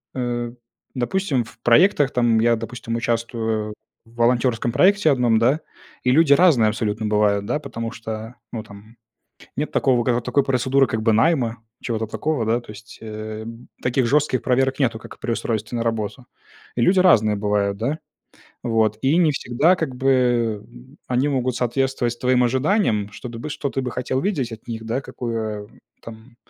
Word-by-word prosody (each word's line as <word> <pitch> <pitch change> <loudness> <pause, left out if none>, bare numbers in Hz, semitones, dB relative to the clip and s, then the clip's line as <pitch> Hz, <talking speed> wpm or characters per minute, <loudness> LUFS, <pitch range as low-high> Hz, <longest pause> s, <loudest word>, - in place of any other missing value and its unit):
э, 120 -2 -2 0.4
допустим, 135 +1 0
в 115 - -17
проектах, 145 - +4
там 120 -2 +2
я, 115 +1 +3
допустим, 115 +1 -5
участвую 115 -2 -2 0.3
в 115 +1 -21
волонтерском 120 0 +1
проекте 190 - +4
1, 120 -4 +3
да, 130 +7 +3 0.4
и 125 - +3
люди 150 +1 +5
разные 140 -9 +5
абсолютно 105 0 -2
бывают, 105 -1 +2
да, 150 - -1
потому 115 -5 -5
что, 115 0 -7 0.2
ну 110 -2 -5
там, 105 +2 -15 0.6
нет 150 +2 -2
такого, 125 -3 +2
ка 120 -1 +1
такой 140 +3 +1
процедуры 135 0 +2
как 110 -2 -3
бы 110 0 +3
найма, 120 0 +2 0.3
чего-то 115 -2 -2
такого, 135 +1 -2
да, 115 +2 +1
то 120 - -13
есть, 110 +2 -12
э, 110 0 -6
б 115 +2 -10 0.2
таких 125 0 +1
жестких 140 0 +2
проверок 135 0 +1
нету, 120 -5 +1
как - - -12
при 120 - -2
устройстве 115 0 -3
на 115 - -1
работу. 115 +1 -3 0.5
И - - 0
люди 185 +9 +4
разные 110 - +5
бывают, 100 -1 0
да. 130 +9 -2 0.7
Вот. 110 -3 +1
И 140 +5 +3
не 170 -4 +4
всегда, 145 +6 +2
как 155 -7 -3
бы, 130 +2 -2
э, 120 -4 +2
м, 120 +6 -17
они 125 +3 +1
могут 130 -3 -1
соответствовать 125 -1 -1
твоим 125 0 +3
ожиданиям, 125 - +1
чтобы 115 +4 -8
ты, 150 - -6
что 145 -1 -3
ты 135 - -2
бы 125 -1 -4
хотел 130 +2 -2
видеть 145 - -1
от 110 -1 -10
них, 115 -1 -6
да, 120 +4 -2
какое, 110 -5 -4
м, 105 - -19 0.2
там 115 +2 -12
120 Hz, 175 wpm, -22 LUFS, 110-135 Hz, 0.7 s, люди